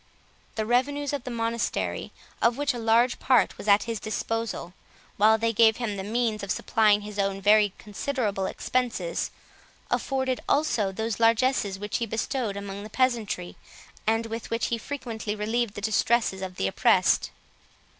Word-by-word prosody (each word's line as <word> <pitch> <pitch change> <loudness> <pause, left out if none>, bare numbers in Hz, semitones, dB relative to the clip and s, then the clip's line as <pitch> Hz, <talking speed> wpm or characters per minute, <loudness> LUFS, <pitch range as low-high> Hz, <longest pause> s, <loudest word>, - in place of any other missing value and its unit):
The 220 - -1
revenues 280 +5 +1
of 280 -4 -3
the - - -4
monastery, 230 -1 -2 0.3
of 235 +1 +3
which 285 -1 0
a 240 - -5
large 230 +2 +3
part 255 -1 +3
was - - -7
at 205 0 +5
his 230 -2 -3
disposal, 220 -4 -3 0.4
while 220 +2 +5
they 225 +1 0
gave 220 0 +5
him 230 -4 -2
the 190 - -4
means 220 0 -1
of 200 - -6
supplying 210 +1 +3
his 205 0 -7
own 195 0 0
very 205 0 +4
considerable 210 -3 -2
expenses, 230 -10 -2 0.6
afforded 260 -2 0
also 235 -10 +2
those 220 +3 -3
largesses 230 -3 +2
which 205 +1 -3
he 235 - -2
bestowed 225 -1 -2
among 200 0 -6
the 210 - -8
peasantry, 225 -7 -1 0.5
and 225 +1 +2
with 225 0 -6
which 230 0 -1
he 235 - -1
frequently 225 -5 -5
relieved 220 +1 -1
the 205 - -6
distresses 220 -1 +1
of 185 -1 -5
the - - -1
oppressed. 95 - +3
225 Hz, 160 wpm, -26 LUFS, 205-240 Hz, 0.6 s, at